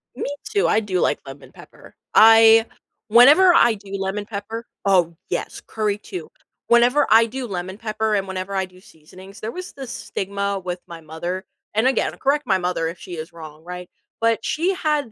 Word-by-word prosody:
Me - - -4 0.2
too, 420 -1 +1
I 215 - +3
do 195 -4 -2
like - - +1
lemon 135 +1 -12
pepper, - - -16 0.2
I 225 0 +7 0.4
whenever 290 - +7
I 240 -8 +5
do 200 -2 -11
lemon 195 +2 -3
pepper 220 +2 -6 0.2
oh, 180 -4 +2
yes, - - -4
curry 210 -2 -1
too. 365 - -8 0.4
Whenever 240 +4 +4
I 225 +1 +7
do 255 +2 -5
lemon 185 -1 -5
pepper 220 -1 -2
and 195 -1 -1
whenever 190 +1 -5
I 190 0 0
do 185 0 -19
seasonings, 185 +4 -15
there 220 +1 -5
was 365 +5 -8
this 270 -3 -8
stigma 200 0 -3
with 180 0 -4
my 170 -1 -10
mother 175 +4 -5 0.3
and 220 +4 +2
again, 260 -3 0
correct 285 +1 0
my 190 -3 +3
mother 180 -2 -1
if 165 +2 -6
she 180 - -8
is 160 +2 -7
wrong, 155 -1 -11
right? 180 0 -8 0.3
But 230 0 +1
she 350 +5 0
had 300 -8 -1
205 Hz, 185 wpm, -21 LUFS, 185-230 Hz, 0.4 s, I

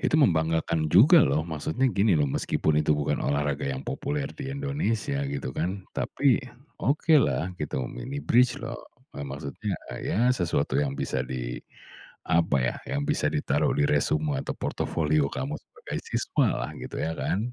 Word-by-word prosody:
Itu - - +2
membanggakan 80 - +2
juga 145 - +7
loh. 75 - +2
Maksudnya 80 - -2
gini 100 -1 +3
loh, 75 - +3
meskipun 75 +2 +1
itu 75 -1 +2
bukan 75 - -1
olahraga 70 -1 0
yang 65 0 -4
populer 145 -1 -3
di 140 -2 -6
Indonesia 140 -1 -1
gitu 140 -1 -4
kan, 95 +3 -3
tapi 135 -4 +2 0.4
okelah 140 - +3
gitu, 70 -3 -2
mini 135 +3 -6
bridge 125 0 +4
loh. - - -6 0.3
Eee, - - -7
maksudnya, 70 +1 -4 0.2
eee, - - -5
iya 120 +5 +3
sesuatu 85 - 0
yang 70 -1 -1
bisa 65 - -2
di, 60 -1 -4 0.6
apa 80 -4 +2
ya, 60 - 0 0.2
yang 145 +1 -1
bisa 150 - +1
ditaruh 145 -2 +1
di 145 - +3
resume 150 0 +1
atau - - -4
portofolio 75 -3 0
kamu 70 +2 -3
sebagai - - -7
siswalah - - 0
gitu - - -7
ya 80 - -1
kan? 110 +6 -1
90 Hz, 160 wpm, -27 LUFS, -, 0.6 s, juga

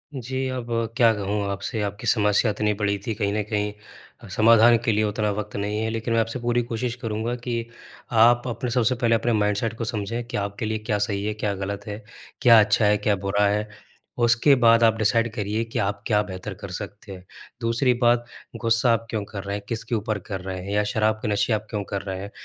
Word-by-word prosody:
जी। 130 +1 -3
अब 125 -2 -4 0.3
क्या 115 -3 +6
कहूँ 105 0 -2
आपसे? 100 +3 -3
आपकी 100 0 -4
समस्या 105 0 +3
इतनी 105 0 0
बड़ी 100 -1 -1
थी, 115 - 0
कहीं 100 -2 -1
न 105 - 0
कहीं 105 -1 -1 0.6
समाधान 115 +1 +6
के 115 - +3
लिए 110 0 +2
उतना 105 0 0
वक़्त 105 +1 -5
नहीं 105 +1 -2
है, 110 - -1
लेकिन 115 +1 -2
मैं 115 - +3
आपसे 115 +3 -3
पूरी 120 0 +1
कोशिश 120 +1 -3
करूँगा 115 +1 -2
कि 115 -2 -2 0.6
आप 120 +1 +3
अपने 125 +1 -3
सबसे 125 +1 +2
पहले 115 -1 +2
अपने 120 +1 0
माइंडसेट 105 +2 0
को 115 - -3
समझें 115 +1 -3
कि - - -4
आपके 100 +2 -3
लिए 110 0 -1
क्या 105 - +2
सही 100 -1 -2
है, 105 - -1
क्या 105 -1 -2
गलत 100 +1 -5
है, 105 +1 -6 0.4
क्या 115 -2 +8
अच्छा 105 0 +3
है, 105 0 +4
क्या 105 0 +1
बुरा 100 +1 +2
है। 105 +1 0 0.5
उसके 120 +4 +4
बाद 115 0 +6
आप 115 -1 +5
डिसाइड 115 +1 +2
करिए 105 0 -2
कि 115 - -4
आप 100 0 -1
क्या 105 -3 +3
बेहतर 95 0 -7
कर 100 - -6
सकते 105 0 -9
हैं। 90 -1 -9 0.4
दूसरी 120 +2 +2
बात, 120 0 +3 0.4
गुस्सा 115 +1 +3
आप 115 0 -1
क्यों 110 -2 -2
कर 100 -2 -7
रहे 100 0 -3
हैं, 100 - -6
किसके 115 +1 -3
ऊपर 110 -1 -2
कर 95 -3 -3
रहे 95 0 -5
हैं 100 - -6
या 105 0 +2
शराब 110 +1 +1
के 125 - -3
नशे 105 +2 +1
आप 110 0 -2
क्यों 105 -2 -3
कर 100 - -2
रहे 95 -1 -5
हैं, 100 +1 -7
110 Hz, 225 wpm, -24 LUFS, 105-115 Hz, 0.6 s, क्या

